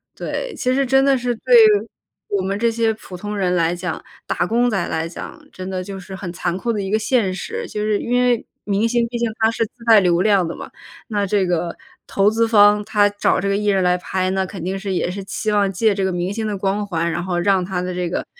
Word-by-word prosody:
对， - - -4
其 255 0 0
实 275 0 +2
真 270 +2 +3
的 275 - +4
是 245 -1 -1
对 - - -1 0.8
我 200 -2 0
们 195 +1 -2
这 230 +2 +1
些 225 -1 +1
普 195 -3 -11
通 205 +3 -5
人 180 -2 +1
来 170 0 +1
讲、 175 -2 -5 0.2
打 - - -1
工 240 +2 +2
仔 195 -7 0
来 160 +1 -2
讲 165 - -9
真 185 0 -7
的 185 -1 -3
就 195 0 -7
是 190 +1 -9
很 185 -2 -6
残 175 0 -2
酷 230 +4 -1
的 205 - -2
一 195 - -4
个 215 - +2
现 220 -3 +1
实。 455 - -5
就 210 - -4
是 210 -1 +1
因 245 +1 0
为 245 -2 +2 0.2
明 205 +3 0
星 235 0 +1
毕 240 - -3
竟 235 -1 0
他 220 0 +3
是 230 - -1
自 225 - -6
带 225 -2 +7
流 175 -2 +2
量 195 -5 +3
的 165 - -5
嘛， - - -9 0.4
那 205 -2 0
这 200 0 +1
个 175 -1 -2 0.3
投 200 +2 +2
资 230 +1 +2
方， 210 -1 +5
他 205 0 +3
找 205 0 +1
这 200 - -2
个 200 - +1
艺 210 0 -1
人 195 -2 +2
来 180 0 +3
拍， 185 0 -1
那 190 0 0
肯 185 -2 -7
定 190 +2 -2
是 195 -1 -4
也 175 - 0
是 195 +1 -6
期 215 +2 -3
望 200 -2 +2
借 210 +3 +2
这 195 -1 -2
个 190 - 0
明 180 +2 -2
星 220 0 -3
的 205 - -2
光 200 +2 -1
环， 170 -2 -1
然 175 +1 -3
后 180 -1 -2
让 190 +1 +2
他 180 0 -3
的 180 0 -3
这 180 -1 -2
个 - - -3
200 Hz, 280 characters per minute, -20 LUFS, 185-220 Hz, 0.8 s, 带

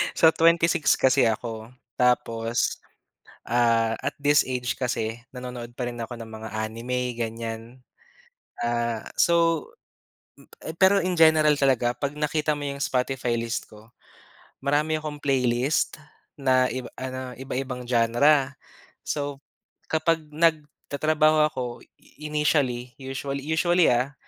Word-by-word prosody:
So, 160 -1 +6
26 165 -1 +3
kasi 130 -2 +3
ako, 115 +1 -4 0.2
tapos, 115 -2 +1 0.7
ah, 115 -1 +2
at - - -3
this 145 0 +4
age 125 -1 -2
kasi 115 -2 -3
nanonood 125 -2 -8
pa 125 - -2
rin 120 -1 -5
ako 120 +1 -6
ng 115 -1 -9
mga 110 0 -7
anime 115 +3 -3
ganyan. 115 -1 -4 1.0
Ah, 120 -1 -2
so, 165 -2 +2 0.7
mm, 160 - -11
pero 195 +2 +5
in 185 0 -1
general 155 -2 +5
talaga 125 -3 +2
'pag 140 0 -2
nakita 150 0 0
mo 145 -1 -3
yung 140 0 -6
Spotify 125 -1 -1
list 115 0 -3
ko, 105 +1 -15 0.7
marami 150 +3 +1
akong 150 -1 -5
playlist 130 0 0 0.4
na 130 -2 +3
iba 130 +1 -5
ano, 130 0 -6
iba-ibang 125 -2 -5
genre. 130 +4 +3 0.5
So 145 -2 -3 0.5
kapag 160 +1 +1
nagtatrabaho 155 -1 +2
ako 130 - -5 0.4
i 150 +1 -11
initially 130 -5 0
usually 135 +1 -4
usually, 175 +2 +3
ah, 125 +4 +1
130 Hz, 120 wpm, -25 LUFS, 120-150 Hz, 1.0 s, So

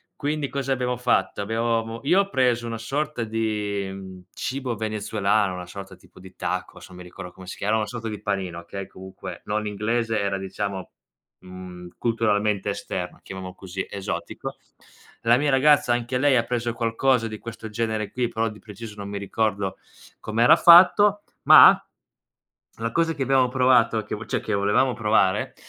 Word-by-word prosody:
Quindi 150 0 -2
cosa 140 -1 -3
abbiamo 125 -1 -2
fatto? 125 -4 0
Abbia 110 +3 -3
avevamo 115 -1 -1
io 180 +7 +5
ho 200 - -4
preso 125 -6 +1
una 115 -1 -4
sorta 140 +2 -2
di 100 -4 -3
cibo 130 -2 -3
venezuelano, 105 -2 0
una 90 -1 -7
sorta 95 +1 -9
tipo - - -20
di 95 0 -14
tacos, - - -4
non 90 - -14
mi 90 - -9
ricordo 90 0 -10
come 95 +1 -13
si 90 - -7
chiama, 105 +3 0
una 110 -1 0
sorta 115 +2 -6
di 105 -2 -6
panino, 95 -4 -3
okay, 95 +3 -7
comunque 95 -1 -10
non 105 +1 -1
è - - -1
inglese, 115 +2 -1
era 100 -1 -1
diciamo, 95 0 -5 0.5
mhmm, 90 -1 -10
culturalmente 105 -3 0
esterno, 90 -2 -5
chiamiamolo 95 -1 -8
così, 95 +1 -6
esotico. 100 0 -5 0.6
La 115 +1 +4
mia 145 +1 +1
ragazza 140 -1 +4
anche 120 +1 -1
lei 140 +1 +3
ha 120 - +3
preso 120 -1 -2
qualcosa 115 +1 +1
di 110 -1 -6
questo 115 0 -8
genere 110 -1 -2
qui, 125 -1 -1
però 115 0 -1
di 105 -1 -12
preciso 105 0 -10
non 100 -1 -7
mi 100 - -4
ricordo 100 -1 -1 0.4
com'era 115 +3 +4
fatto, 195 +4 +7 0.2
ma - - +9 1.0
la 115 0 -2
cosa 165 +5 +1
che 140 - -3
abbiamo 130 -1 +3
provato, 125 -3 +3
che 100 - -5
cioè - - -1
che 110 - -3
volevamo 105 +6 +2
provare, 105 -4 +1
110 Hz, 170 wpm, -24 LUFS, 100-120 Hz, 1.0 s, ma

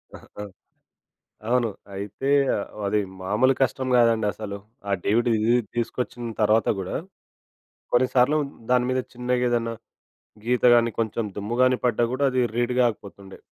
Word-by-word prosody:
ఆహా! 105 - -10 1.1
అవును. 120 -1 +2 0.3
అయితే 100 +7 -5 0.6
అది 105 +1 +1 0.2
మామూలు 110 +8 +2
కష్టం 130 0 0
గాదండి 115 -3 +3
అసలు. 105 -2 -6 0.3
ఆ - - -2
డీవీడిది 115 +1 +2 0.2
తీసుకొచ్చిన 120 0 -3
తర్వాత 105 0 +3
గూడా 95 -1 -3 1.0
కొన్నిసార్లు 130 +3 +3 0.3
దాని 125 -1 +3
మీద 130 0 +1
చిన్నగా 125 0 0
ఏదన్నా 115 -1 -1 0.7
గీత 125 +1 0
గాని 115 0 +3
కొంచెం 115 0 -1
దుమ్ము 105 +4 -3
గాని 130 0 +3
పడ్డా 120 -1 +2
గూడా 135 +2 -1
అది 130 0 +1
రీడ్ 120 +1 0
కాకపోతుండే. 100 -4 -4
120 Hz, 125 wpm, -24 LUFS, 105-125 Hz, 1.1 s, గాదండి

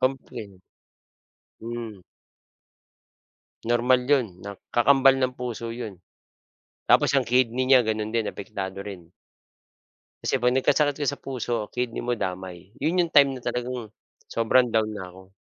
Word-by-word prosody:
Komplin 120 -7 -3 1.0
Hmm. 115 -4 -6 1.7
Normal 120 +2 +3
'yon, 140 -4 +4 0.2
nak 100 0 -7 0.2
kakambal 135 +2 +5
ng 130 -1 0
puso 120 -2 -4
'yon. 115 -3 -6 1.0
Tapos - - +5
ang - - +2
kidney 125 0 +2
niya 130 -2 +6
gano'n 110 0 -2
din, 115 -2 0
apektado 100 -2 -6
rin. 95 -3 -7 1.2
Kasi - - +1
'pag 125 -1 +2
nagkasakit 145 +2 +2
ka 145 - 0
sa - - -5
puso, 125 -3 -3 0.2
kidney 125 -1 -3
mo 120 - 0
damay. 95 -4 -5
Yun 165 +5 +1
yung 170 -2 0
time 140 -1 +7
na 130 - -7
talagang 125 -1 -4 0.4
sobrang 120 +2 +3
down 110 -1 +1
na 95 -3 -7
ako. 95 +1 -16
120 Hz, 135 wpm, -25 LUFS, 105-130 Hz, 1.7 s, time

